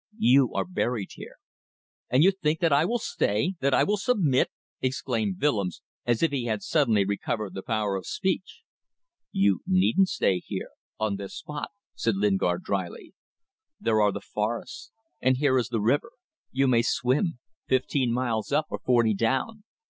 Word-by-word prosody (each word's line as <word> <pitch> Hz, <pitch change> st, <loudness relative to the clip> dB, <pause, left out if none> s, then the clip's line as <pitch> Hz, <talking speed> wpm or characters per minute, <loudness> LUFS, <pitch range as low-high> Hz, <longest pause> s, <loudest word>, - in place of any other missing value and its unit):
You 135 Hz, -, +4 dB
are -, -, 0 dB
buried 125 Hz, -, -2 dB
here." -, -, -10 dB, 0.7 s
"And 130 Hz, +5 st, +4 dB
you 190 Hz, -, +6 dB
think 160 Hz, -5 st, -1 dB
that 165 Hz, -4 st, +3 dB
I 145 Hz, +3 st, +4 dB
will 235 Hz, +6 st, +1 dB
stay... 140 Hz, -, 0 dB
that 140 Hz, 0 st, +1 dB
I -, -, +4 dB
will 210 Hz, +1 st, +1 dB
submit?" 185 Hz, -, +2 dB, 0.3 s
exclaimed 115 Hz, -6 st, -1 dB
Willems, 105 Hz, -, 0 dB, 0.2 s
as 120 Hz, +2 st, +2 dB
if 165 Hz, -, +3 dB
he 135 Hz, -4 st, -2 dB
had 110 Hz, -3 st, -2 dB
suddenly 115 Hz, -11 st, +2 dB
recovered 100 Hz, +1 st, -2 dB
the 95 Hz, -, -5 dB
power 110 Hz, -3 st, -1 dB
of 95 Hz, -, -5 dB
speech. 190 Hz, -, -2 dB, 0.7 s
"You 100 Hz, 0 st, +2 dB
needn't 185 Hz, 0 st, +3 dB
stay 95 Hz, -2 st, +1 dB
here -, -, -6 dB, 0.3 s
on 110 Hz, -2 st, 0 dB
this 100 Hz, -1 st, -7 dB
spot," 150 Hz, -1 st, -6 dB, 0.2 s
said 115 Hz, -3 st, 0 dB
Lingard, 95 Hz, -3 st, +1 dB
drily. 95 Hz, -3 st, -4 dB, 0.7 s
"There 110 Hz, -1 st, +2 dB
are 105 Hz, -1 st, +4 dB
the -, -, -5 dB
forests 115 Hz, -, -4 dB, 0.3 s
and 130 Hz, 0 st, +3 dB
here 130 Hz, -2 st, +3 dB
is 120 Hz, -, -1 dB
the 120 Hz, -2 st, -1 dB
river. 145 Hz, -, +1 dB, 0.4 s
You 135 Hz, +1 st, +2 dB
may 120 Hz, -2 st, +4 dB
swim. 130 Hz, +7 st, 0 dB, 0.3 s
Fifteen 130 Hz, -1 st, +1 dB
miles 120 Hz, -2 st, -1 dB
up, 150 Hz, +2 st, +2 dB
or -, -, -3 dB
forty 120 Hz, -3 st, +3 dB
down. 135 Hz, -, -1 dB
125 Hz, 165 wpm, -26 LUFS, 105-150 Hz, 0.7 s, you